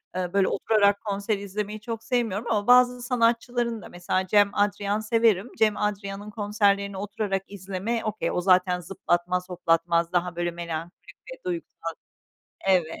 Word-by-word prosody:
Eee, 180 0 -2
böyle, 195 -1 +3
oturarak 205 -2 +2
konser 200 0 -1
izlemeyi 205 +2 -5
çok 225 0 -5
sevmiyorum 230 -2 -1
ama 205 0 0
bazı 250 0 +6
sanatçıların 235 -1 0
da - - -11
mesela 180 +1 -2
Cem 205 0 +5
Adrian 205 0 +1
severim, 225 -1 +2
Cem 215 -1 +3
Adrian'ın 205 0 -3
konserlerini 200 -2 +1
oturarak 200 -1 -2
izleme 200 +4 -3
okay, 215 0 -2
o 180 - -1
zaten 180 -1 +3
zıplatmaz, 180 0 -1
hoplatmaz, 170 0 +1
daha, 175 -1 0
böyle, 175 0 -1
melankolik 170 0 -7 0.2
ve - - -16
duygusal 345 -2 -4 0.8
Evet, 180 -4 +4
200 Hz, 145 wpm, -26 LUFS, 180-220 Hz, 0.8 s, bazı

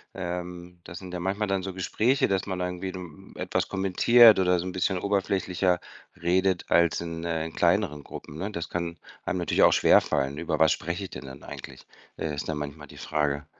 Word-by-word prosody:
Ähm, 90 -1 -6
das 85 - -9
sind 90 -1 -9
ja 90 - -3
manchmal 100 +4 -1
dann 95 -1 0
so 95 -1 -5
Gespräche, 110 +8 +1
dass 95 -2 0
man 95 -2 -3
da 90 - 0
irgendwie, 90 +1 -4
hm, 90 -5 -10
etwas - - -1
kommentiert 100 +4 +6
oder 90 -1 +3
so 90 - -4
'n 95 - -3
bisschen 95 +1 0
oberflächlicher 95 -2 0 0.4
redet 95 +1 +1
als 85 -1 +4
in 85 -1 -5
äh, 80 -1 -2
in 80 - -7
kleineren 85 -5 +1
Gruppen, 75 - -10
ne? 100 +5 -3
Das 85 -3 -5
kann 85 -1 -3 0.3
einem - - -2
natürlich 85 - +2
auch - - +7
schwerfallen. 70 +1 +3
“Über 80 -2 -1
was 80 -2 +5
spreche 85 +4 -2
ich 95 - -6
denn - - -8
dann 65 +2 -11
eigentlich?“, - - -10 0.3
äh, 80 - -3
ist 70 +2 -5
dann 75 - -2
manchmal 75 0 -6
die - - -14
Frage. 75 -1 -1
90 Hz, 205 wpm, -27 LUFS, 80-95 Hz, 0.4 s, auch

